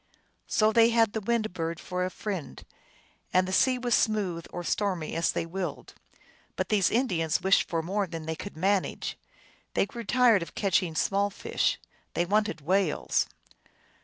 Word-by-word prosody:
So 215 Hz, 0 st, +3 dB
they 230 Hz, +1 st, +5 dB
had 225 Hz, -2 st, +3 dB
the 220 Hz, -, -2 dB
Wind 220 Hz, -2 st, 0 dB
Bird 165 Hz, -1 st, -3 dB
for 180 Hz, 0 st, -3 dB
a 185 Hz, -, -1 dB
friend, 190 Hz, -4 st, -5 dB, 0.7 s
and 185 Hz, 0 st, +3 dB
the 185 Hz, -, -3 dB
sea 255 Hz, +6 st, +4 dB
was 245 Hz, -1 st, -1 dB
smooth 195 Hz, -7 st, +1 dB
or 175 Hz, -, -5 dB
stormy 185 Hz, -4 st, -1 dB
as 165 Hz, 0 st, +1 dB
they -, -, -2 dB
willed. 180 Hz, +2 st, -5 dB, 0.6 s
But -, -, -2 dB
these 205 Hz, -4 st, +3 dB
Indians 175 Hz, -, 0 dB
wished 190 Hz, +1 st, +3 dB
for 165 Hz, -1 st, -1 dB
more 195 Hz, +3 st, -1 dB
than 165 Hz, -2 st, -6 dB
they 160 Hz, 0 st, -3 dB
could 200 Hz, +1 st, -8 dB
manage. 195 Hz, +3 st, 0 dB, 0.6 s
They -, -, +3 dB
grew 235 Hz, +3 st, -8 dB
tired 235 Hz, -2 st, +4 dB
of 170 Hz, -, -7 dB
catching 180 Hz, -4 st, +1 dB
small 200 Hz, +5 st, +1 dB
fish; 200 Hz, -, -1 dB, 0.4 s
they 175 Hz, -, +1 dB
wanted 205 Hz, -4 st, 0 dB
whales. 180 Hz, +1 st, +1 dB
195 Hz, 165 wpm, -28 LUFS, 170-215 Hz, 0.7 s, they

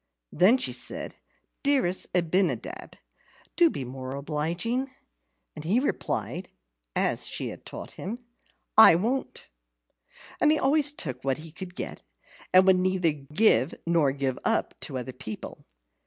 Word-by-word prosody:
Then 210 Hz, +8 st, +5 dB
she 255 Hz, -, 0 dB
said, -, -, -3 dB, 0.4 s
"Dearest 265 Hz, -11 st, +1 dB
Abinadab, 180 Hz, +2 st, 0 dB, 0.6 s
do 345 Hz, -2 st, +5 dB
be 135 Hz, -, -5 dB
more 130 Hz, +1 st, -6 dB
obliging!" 170 Hz, -, -2 dB, 0.7 s
And 150 Hz, -, -7 dB
he 195 Hz, +10 st, +2 dB
replied 280 Hz, -, -2 dB, 0.5 s
(as -, -, +1 dB
she -, -, -3 dB
had -, -, -10 dB
taught -, -, -8 dB
him), 210 Hz, +6 st, -4 dB, 0.6 s
"I 220 Hz, -6 st, +9 dB
won't." 235 Hz, +10 st, -2 dB, 1.0 s
He 310 Hz, +1 st, +5 dB
always 290 Hz, +1 st, +3 dB
took 145 Hz, -, -5 dB
what 135 Hz, -1 st, 0 dB
he 155 Hz, +1 st, -9 dB
could 180 Hz, +1 st, -9 dB
get, -, -, -5 dB, 0.5 s
and 185 Hz, 0 st, +7 dB
would 190 Hz, -1 st, +6 dB
neither 185 Hz, -2 st, +2 dB
give 150 Hz, -, +2 dB
nor 165 Hz, -5 st, +3 dB
give 135 Hz, -2 st, -2 dB
up -, -, +1 dB
to 130 Hz, -, -4 dB
other 130 Hz, +1 st, -5 dB
people. 110 Hz, -3 st, -8 dB
175 Hz, 135 wpm, -27 LUFS, 145-230 Hz, 1.0 s, I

